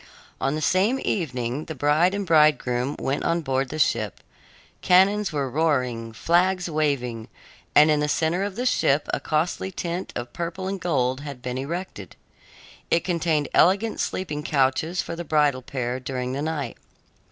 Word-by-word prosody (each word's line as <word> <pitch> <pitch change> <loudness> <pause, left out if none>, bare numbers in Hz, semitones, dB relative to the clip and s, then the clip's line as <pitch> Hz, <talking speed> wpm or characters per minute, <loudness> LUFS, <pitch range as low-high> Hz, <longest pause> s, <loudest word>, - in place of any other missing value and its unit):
On 135 +2 0
the 155 - -3
same 205 +9 +2
evening 130 - -2
the 160 - -6
bride 150 +7 +2
and 200 -1 -2
bridegroom 150 -5 +3
went 135 +2 -2
on 170 0 +1
board 135 -2 -1
the 155 - -5
ship. 115 -8 0 0.6
Cannons 195 +3 +4
were 140 -3 -1
roaring, 125 -6 0
flags 180 +8 +1
waving, 140 -8 -1 0.5
and 150 +1 +7
in 150 - +2
the 150 - +1
center 160 +4 0
of 200 -1 -3
the 245 +3 -3
ship 145 - +2
a - - +1
costly 160 +4 -1
tent 175 0 -4
of 120 0 -5
purple 175 +2 -4
and 195 -1 -4
gold 130 -7 0
had 140 -3 -7
been 125 0 -3
erected. 145 - -6 0.7
It 165 - +2
contained 165 -4 0
elegant 200 +5 +3
sleeping 155 -5 -2
couches 150 +5 +1
for - - -6
the 170 - -5
bridal 150 -4 +2
pair 125 -1 -3
during 125 -1 -4
the 140 - -3
night. 150 -5 -3
150 Hz, 165 wpm, -24 LUFS, 130-175 Hz, 0.7 s, and